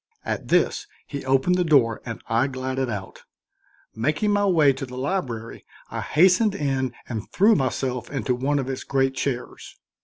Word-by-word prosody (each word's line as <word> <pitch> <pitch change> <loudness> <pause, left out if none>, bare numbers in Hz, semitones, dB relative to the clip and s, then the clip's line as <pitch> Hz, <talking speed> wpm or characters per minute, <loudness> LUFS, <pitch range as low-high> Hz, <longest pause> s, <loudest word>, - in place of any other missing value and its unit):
At - - -3
this - - +2 0.2
he 140 -2 -6
opened 135 +8 +2
the - - +3
door 135 -9 +3
and 115 -2 -7
I 115 +4 +2
glided 130 -1 -3
out. 100 -4 -6 0.7
Making 150 - 0
my 205 0 +2
way 155 -7 +5
to 135 +1 -5
the 125 0 -9
library 130 - -3 0.3
I - - -3
hastened 185 +6 +4
in 135 - -1
and 110 -3 -5
threw 210 +4 +5
myself 130 - -1
into 130 -3 -1
one 135 +4 0
of 135 -2 -2
its 135 -1 -4
great 135 -1 +1
chairs. 130 -2 -4
135 Hz, 165 wpm, -24 LUFS, 125-155 Hz, 0.7 s, way